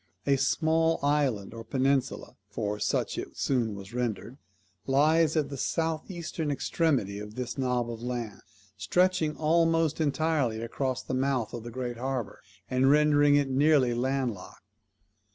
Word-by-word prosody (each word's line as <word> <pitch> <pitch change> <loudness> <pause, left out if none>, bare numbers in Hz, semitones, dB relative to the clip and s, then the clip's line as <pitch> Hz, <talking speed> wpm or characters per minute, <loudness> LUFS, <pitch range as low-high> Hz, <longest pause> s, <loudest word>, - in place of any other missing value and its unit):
A 140 - +3
small 160 +4 +2
island, 140 -9 0
or 115 0 -8
peninsula 135 +2 -1
(for 105 0 -3
such - - -1
it - - -8
soon 120 -6 0
was 100 +2 -10
rendered), 120 +1 -3 0.5
lies 155 +4 +3
at 145 -3 +1
the 140 - -6
south 160 +4 -2
eastern 170 -3 -4
extremity 135 - 0
of 105 +1 -9
this 125 -2 -4
knob 125 -2 0
of 115 -1 -7
land, 120 -4 -4 0.4
stretching 160 - +1
almost 165 0 +2
entirely 145 -6 0
across 130 +3 -3
the - - -5
mouth 130 -3 0
of 120 - -5
the 120 - -7
great 120 0 -5
harbour, 130 -3 -4 0.3
and 130 +1 +2
rendering 145 0 +5
it 140 -2 +1
nearly 135 -2 +3
land 130 0 0
locked. 95 - -13
135 Hz, 150 wpm, -28 LUFS, 120-150 Hz, 0.5 s, rendering